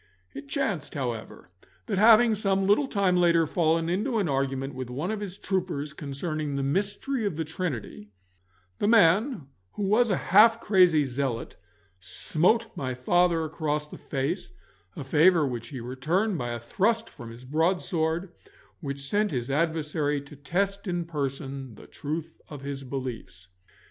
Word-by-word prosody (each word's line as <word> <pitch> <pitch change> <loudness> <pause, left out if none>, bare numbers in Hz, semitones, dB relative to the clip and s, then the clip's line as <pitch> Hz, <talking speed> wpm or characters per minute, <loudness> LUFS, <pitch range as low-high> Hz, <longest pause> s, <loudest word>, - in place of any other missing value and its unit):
It 140 +1 -8
chanced, 155 0 -2
however, 120 -8 -5 0.3
that 200 -5 -1
having 225 +1 +7
some 195 -2 +1
little 210 +8 +3
time 195 -6 +2
later 170 -2 +4
fallen 165 0 +1
into 210 +8 0
an 200 -5 +1
argument 135 -1 -1
with 130 -1 -6
one 145 +10 -3
of 215 - -3
his 200 -2 -6
troopers 175 -8 -2
concerning 150 0 -4
the 140 - -1
mystery 205 - -1
of 200 -6 -1
the 160 0 -2
Trinity, 150 - -5 0.7
the - - +1
man, 215 - +4 0.3
who 205 - -4
was 220 +4 +3
a 190 - +2
half 225 +4 +5
crazy 180 -9 +4
zealot, 130 -2 -3 0.4
smote 180 - +1
my 130 -2 -3
father 170 +5 +2
across 150 -1 -2
the - - -11
face, 150 +7 -3 0.4
a - - -5
favour 155 +4 +4
which 120 -4 -4
he 130 +1 -7
returned 155 - -1
by 120 -6 -3
a 120 - -4
thrust 220 - 0
from 120 - -11
his 120 +2 -11
broadsword, 165 +3 0 0.5
which 140 -3 -5
sent 210 +4 +1
his 125 -2 -3
adversary 150 -1 0
to 140 +1 -13
test 195 +8 -2
in 175 -2 -1
person 135 -5 -4
the - - -14
truth 160 +2 -6
of 145 -3 -8
his 140 -1 -5
beliefs. 120 -9 -6
160 Hz, 155 wpm, -27 LUFS, 135-190 Hz, 0.7 s, having